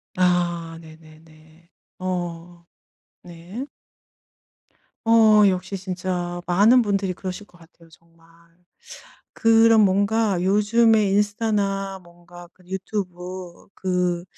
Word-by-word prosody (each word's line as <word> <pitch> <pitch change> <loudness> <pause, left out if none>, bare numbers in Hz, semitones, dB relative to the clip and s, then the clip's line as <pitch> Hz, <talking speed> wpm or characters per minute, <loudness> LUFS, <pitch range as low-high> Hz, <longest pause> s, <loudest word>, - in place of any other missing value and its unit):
아 175 -2 0
네네네. 160 +1 -19 0.3
어 175 -1 -5 0.6
네. 180 +8 -9 1.4
어 215 -2 +6
역시 190 +1 -3
진짜 180 -1 -4
많은 210 +8 +5
분들이 195 -3 -1
그러실 185 +2 -7
것 175 - -23
같아요, 165 0 -21
정말. 165 0 -24 1.1
그런 225 0 +4
뭔가 205 0 +1
요즘에 210 +2 +3
인스타나 200 -2 -1
뭔가 175 0 -15
그 185 - -25
유튜브 185 -2 -6
그 180 -2 -2
185 Hz, 180 characters per minute, -22 LUFS, 175-205 Hz, 1.4 s, 어